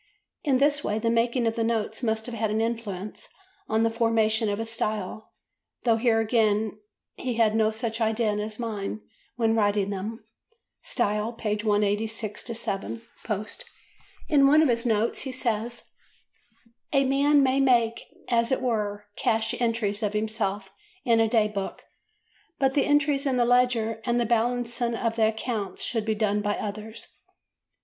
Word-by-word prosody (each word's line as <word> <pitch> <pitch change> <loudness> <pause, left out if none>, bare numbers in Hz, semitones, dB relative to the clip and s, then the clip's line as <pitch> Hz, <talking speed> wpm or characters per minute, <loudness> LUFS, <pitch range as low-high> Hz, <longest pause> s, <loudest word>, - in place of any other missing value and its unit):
In 275 -4 +3
this 290 +2 +2
way 210 - -1
the 230 +1 0
making 235 +1 +1
of 225 0 0
the 230 - 0
notes 225 0 -1
must 220 -2 0
have 245 - -6
had 220 -1 -1
an 215 +1 0
influence 220 -4 -3 0.4
on 220 +1 +2
the 230 - +2
formation 225 -1 +2
of 205 - -1
his 225 +1 -3
style—though 220 +1 -3
here 225 -1 +3
again 215 -2 +1 0.4
he 250 -2 -3
had 225 -2 +3
no 220 -1 +3
such 225 +1 -3
idea 220 0 +1
in 210 - -2
his 215 0 -4
mind 215 -3 -4 0.3
when 225 -1 +2
writing 205 -2 +1
them 215 +4 -5 0.6
("Style," 210 -1 -1
pp. 210 -2 -2
186–7 215 +1 -2 0.2
post) 215 - -4 0.6
In 280 -3 +5
one 305 +3 +6
of - - +4 0.2
the 240 - 0
notes 220 +1 +1
he 265 - -4
says: 235 -2 -2 1.1
"A 275 -1 +3
man 280 +2 +4
may 265 +1 +2
make, 235 -4 +3 0.3
as 235 0 +2
it 260 - +2
were, 210 -4 -1
cash 225 0 +1
entries 225 -3 0
of 210 -1 -1
himself 210 -2 -2 0.3
in 230 -2 +4
a 225 - +4
day 220 -2 +3
book, 200 -2 -5 0.7
but 270 -3 +2
the 280 - +2
entries 290 -1 +2
in 260 -2 +1
the 240 - +3
ledger 240 -2 +2
and 240 -1 +1
the 240 - +1
balancing 235 +1 0
of 230 0 -1
the 220 -1 +3
accounts 220 -3 -3
should 225 -3 -1
be 220 -1 0
done 210 -1 +1
by 205 0 0
others." 215 +2 -6
225 Hz, 160 wpm, -26 LUFS, 215-240 Hz, 1.1 s, one